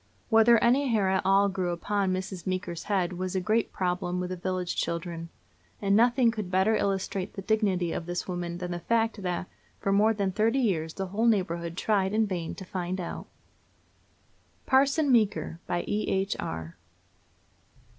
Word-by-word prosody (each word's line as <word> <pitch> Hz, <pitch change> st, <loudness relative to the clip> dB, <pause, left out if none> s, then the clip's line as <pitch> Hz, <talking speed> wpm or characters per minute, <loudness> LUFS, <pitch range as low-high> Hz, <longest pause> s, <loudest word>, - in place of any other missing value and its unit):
Whether 225 Hz, +1 st, +6 dB
any 265 Hz, +4 st, +4 dB
hair 215 Hz, -6 st, +2 dB
at 190 Hz, 0 st, +2 dB
all 195 Hz, +1 st, +4 dB
grew 185 Hz, -2 st, -2 dB
upon 190 Hz, +3 st, -1 dB
Mrs. 185 Hz, -1 st, -4 dB
Meeker's 185 Hz, -2 st, -3 dB
head 190 Hz, -3 st, 0 dB
was 185 Hz, +1 st, -4 dB
a -, -, +2 dB
great 215 Hz, +5 st, 0 dB
problem 180 Hz, -1 st, -1 dB
with 180 Hz, 0 st, -3 dB
the -, -, -2 dB
village 185 Hz, 0 st, -3 dB
children, 170 Hz, 0 st, -3 dB, 0.5 s
and 200 Hz, -1 st, +2 dB
nothing 240 Hz, +1 st, +4 dB
could 215 Hz, -5 st, -5 dB
better 190 Hz, +4 st, +3 dB
illustrate 195 Hz, -1 st, -1 dB
the 195 Hz, -, -7 dB
dignity 195 Hz, -5 st, +1 dB
of 165 Hz, -, -4 dB
this 175 Hz, 0 st, -3 dB
woman 175 Hz, -2 st, -3 dB
than 180 Hz, 0 st, -5 dB
the 175 Hz, -, -3 dB
fact 225 Hz, +2 st, 0 dB
that 180 Hz, -1 st, -2 dB, 0.3 s
for 195 Hz, -, -1 dB
more 215 Hz, +3 st, +4 dB
than 200 Hz, -2 st, 0 dB
thirty 225 Hz, +6 st, +1 dB
years 170 Hz, -11 st, 0 dB
the 195 Hz, -, -3 dB
whole 210 Hz, +5 st, 0 dB
neighborhood 170 Hz, -5 st, 0 dB
tried 200 Hz, -1 st, +1 dB
in 220 Hz, 0 st, +3 dB
vain 175 Hz, -5 st, -4 dB
to 190 Hz, -, -9 dB
find 185 Hz, -1 st, -3 dB
out. 175 Hz, -, -5 dB, 1.4 s
PARSON 275 Hz, +2 st, +3 dB
MEEKER. 210 Hz, -7 st, +1 dB
BY 175 Hz, 0 st, -1 dB
E.H. 195 Hz, -2 st, 0 dB
ARR. 80 Hz, 0 st, -5 dB
190 Hz, 170 wpm, -28 LUFS, 180-215 Hz, 1.4 s, Whether